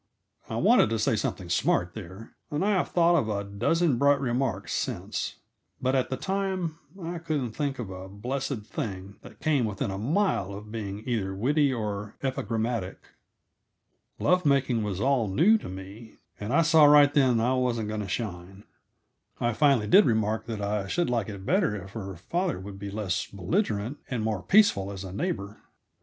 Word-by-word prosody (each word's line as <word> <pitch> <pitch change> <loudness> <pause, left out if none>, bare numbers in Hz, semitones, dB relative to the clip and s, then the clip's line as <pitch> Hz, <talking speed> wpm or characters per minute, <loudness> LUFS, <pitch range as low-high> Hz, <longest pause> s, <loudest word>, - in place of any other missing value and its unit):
I - - -3
wanted - - +4
to 115 - 0
say 110 +1 +1
something 95 -3 -3
smart, 85 0 +1
there, 100 +1 -9 0.2
and 150 +4 -1
I 210 - +3
have 190 -3 +1
thought 170 0 +4
of 120 -10 +1
a 100 -1 -1
dozen 125 +8 +1
bright 140 0 +4
remarks 120 -6 -1
since; - - -3 0.4
but 130 +1 0
at 130 -1 +1
the 130 - -2
time 190 -2 -2 0.2
I 170 0 -5
couldn't 150 -7 -2
think 140 +3 -2
of 110 -6 -5
a 95 +1 -8
blessed 120 +2 -4
thing 100 -2 -5
that - - -14
came 150 -5 +2
within 100 -2 -2
a 95 - -4
mile 120 - 0
of 105 +1 -10
being 105 -1 -5
either 100 -6 -1
witty 140 +7 +2
or 105 -3 -4
epigrammatic. 115 -6 -2 1.1
Love 180 0 +2
making 135 -5 +2
was 100 -3 -3
all 130 -2 +2
new 175 - +4
to - - -8
me, 95 +5 -10 0.2
and 105 +3 -4
I 145 - +4
saw 160 -1 +6
right 145 -1 +7
then 130 -4 +4
that 115 - +1
I 125 - +2
wasn't 120 -4 0
going 110 0 -3
to 100 - -5
shine. 95 -1 -5 0.8
I 120 -1 +1
finally 135 -4 +3
did 190 - +6
remark 110 -1 0
that 110 -3 -4
I 100 -1 -1
should 170 - 0
like 115 -4 0
it 100 -2 -8
better 180 - +2
if 95 -1 -8
her 95 -3 -6
father 170 - -2
would 95 +1 -9
be 100 0 -5
less 100 -4 -2
belligerent 110 - -1
and 120 -4 -2
more 110 -4 -1
peaceful 140 - +4
as 95 -1 -6
a 95 -1 -7
neighbor. 105 - -3
115 Hz, 185 wpm, -27 LUFS, 100-145 Hz, 1.1 s, right